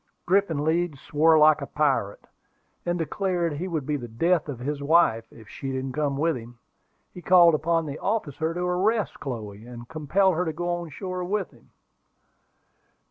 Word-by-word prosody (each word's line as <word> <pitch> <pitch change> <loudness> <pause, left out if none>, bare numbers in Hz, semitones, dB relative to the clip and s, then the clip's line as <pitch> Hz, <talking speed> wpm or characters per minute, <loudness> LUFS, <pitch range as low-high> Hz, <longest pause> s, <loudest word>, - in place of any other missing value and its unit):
Griffin 175 -5 +1
Leeds 165 -2 0
swore 160 +3 +3
like 155 -1 +5
a 140 - -5
pirate, 135 -9 0 0.6
and 175 0 0
declared 175 0 -1
he 165 +6 -4
would 160 -6 -3
be 150 +1 -1
the 120 -3 -7
death 165 +8 +1
of 140 - -4
his 140 +4 -4
wife 140 -7 +2
if 110 -2 -15
she 135 -1 -6
didn't 130 0 -3
come 145 0 -1
with 160 +2 +1
him. 120 0 -10 0.6
He 180 - -9
called 175 -2 +6
upon 165 +2 +1
the 145 -1 -6
officer 160 -7 -2
to 175 +1 -4
arrest 195 +5 0
Chloe, 110 -6 -6
and 120 -1 -10
compel 170 +6 +2
her 180 +1 0
to 160 -2 -3
go 175 +3 -4
on 175 -1 -3
shore 185 +4 -5
with 195 0 -2
him. 120 -4 -22
155 Hz, 180 wpm, -25 LUFS, 135-175 Hz, 0.6 s, called